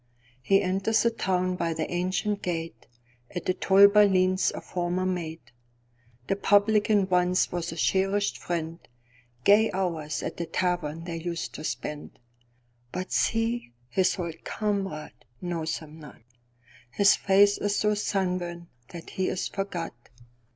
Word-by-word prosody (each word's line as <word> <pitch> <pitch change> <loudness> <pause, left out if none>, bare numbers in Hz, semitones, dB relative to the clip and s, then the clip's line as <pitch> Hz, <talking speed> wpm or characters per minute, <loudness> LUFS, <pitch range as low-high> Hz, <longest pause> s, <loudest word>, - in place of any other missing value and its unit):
He 195 +10 +3
enters 195 +4 +1
the 235 - +3
town 185 -4 0
by 165 -2 -1
the 160 - -2
ancient 185 +3 -1
gate.At 120 -5 -7
the 185 - +2
toll 195 +2 +6
bar 210 +1 +6
leans 185 -1 +2
a - - -5
former 180 +1 -2
mate:The 120 -5 -7
publican 205 0 +3
once 180 0 +2
was 175 -1 -3
a - - -6
cherished 195 +4 +1
friend, 165 -1 -3 0.6
Gay 210 +6 +5
hours 165 -5 -2
at - - -5
the 170 - -3
tavern 165 -3 -1
they 170 -1 -5
used 170 0 -4
to - - -8
spend. 150 -1 -5 0.7
But 185 +1 -5
see, 225 - 0 0.2
his 185 +11 +1
old 170 -3 -5
comrade 195 - -3 0.2
knows 165 -2 -2
him 155 0 -12
not:His 120 - -2
face 200 +1 +4
is 205 0 0
so 210 0 +2
sunburnt 180 -4 -2 0.2
that 170 -1 -9
he 190 - -1
is 185 - -2
forgot. 195 -4 -4
180 Hz, 135 wpm, -27 LUFS, 160-195 Hz, 0.7 s, toll